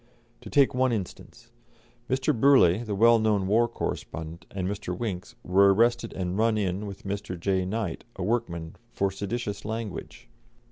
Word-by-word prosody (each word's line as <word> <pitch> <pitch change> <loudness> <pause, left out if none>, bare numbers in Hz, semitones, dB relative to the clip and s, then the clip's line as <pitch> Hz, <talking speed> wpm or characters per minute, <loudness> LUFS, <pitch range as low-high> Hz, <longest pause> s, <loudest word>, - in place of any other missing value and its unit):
To - - -9
take 140 -2 +4
one 130 0 +2
instance: 115 +3 -6 0.6
Mr. 130 0 +1
Burleigh, 120 -6 +5
the 105 -3 -3
well 115 +3 +6
known 105 -3 +2
war 115 +5 +3
correspondent, 80 -5 -5
and 95 -2 -3
Mr. 100 -3 -4
Winks 95 -6 -4
were 100 +2 +5
arrested 115 +2 +2
and 90 +1 -3
"run 110 -1 +3
in" 100 0 -1
with 100 -1 -9
Mr. 100 -2 -4
J. 95 +1 0
Knight, 100 -3 -3
a 95 - -4
workman, 85 -7 -2
for 100 0 0
seditious 100 +1 -4
language. 110 - -6
100 Hz, 155 wpm, -27 LUFS, 95-115 Hz, 0.6 s, well